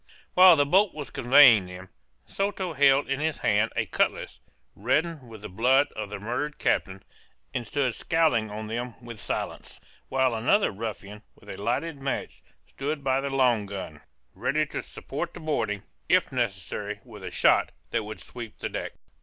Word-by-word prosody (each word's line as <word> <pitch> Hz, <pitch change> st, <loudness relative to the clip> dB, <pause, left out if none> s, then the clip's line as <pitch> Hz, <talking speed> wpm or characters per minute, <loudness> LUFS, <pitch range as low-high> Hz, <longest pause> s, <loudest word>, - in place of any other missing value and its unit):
While 185 Hz, -1 st, +9 dB
the 145 Hz, -2 st, +3 dB
boat 190 Hz, +6 st, +3 dB
was 150 Hz, -2 st, -7 dB
conveying 120 Hz, -6 st, +6 dB
them, 90 Hz, +1 st, -10 dB, 0.4 s
Soto 195 Hz, -3 st, -2 dB
held 140 Hz, -1 st, +4 dB
in 135 Hz, 0 st, -1 dB
his 155 Hz, 0 st, -1 dB
hand 105 Hz, +2 st, +2 dB
a -, -, 0 dB
cutlass, -, -, -1 dB, 0.4 s
reddened 145 Hz, -, -1 dB
with 110 Hz, -2 st, -11 dB
the -, -, -5 dB
blood 130 Hz, +9 st, +3 dB
of 105 Hz, -2 st, -5 dB
the 105 Hz, -, -5 dB
murdered 135 Hz, +8 st, -3 dB
captain, 95 Hz, 0 st, -1 dB, 0.5 s
and 120 Hz, -2 st, -3 dB
stood 135 Hz, -3 st, 0 dB
scowling 155 Hz, -11 st, +1 dB
on 105 Hz, +1 st, -6 dB
them 120 Hz, +2 st, -4 dB
with 120 Hz, -3 st, -10 dB
silence: -, -, -5 dB, 0.3 s
while 130 Hz, -2 st, +2 dB
another 120 Hz, -, +2 dB
ruffian, 105 Hz, -1 st, -7 dB
with -, -, -17 dB
a 95 Hz, -, -7 dB
lighted 135 Hz, +7 st, -2 dB
match, 135 Hz, -, -4 dB, 0.2 s
stood 145 Hz, +1 st, -4 dB
by 135 Hz, 0 st, +1 dB
the 140 Hz, -, -3 dB
long 125 Hz, -6 st, +2 dB
gun, 95 Hz, -7 st, -7 dB, 0.3 s
ready -, -, 0 dB
to -, -, -5 dB
support -, -, -6 dB
the -, -, -8 dB
boarding, 115 Hz, -10 st, -2 dB, 0.3 s
if -, -, +3 dB
necessary, 105 Hz, -3 st, -3 dB
with 105 Hz, -5 st, -12 dB
a 95 Hz, -, -4 dB
shot -, -, +3 dB, 0.2 s
that 115 Hz, -, 0 dB
would 105 Hz, +1 st, -8 dB
sweep 120 Hz, -3 st, -9 dB
the -, -, -4 dB
deck. -, -, -5 dB
120 Hz, 170 wpm, -26 LUFS, 105-145 Hz, 0.5 s, While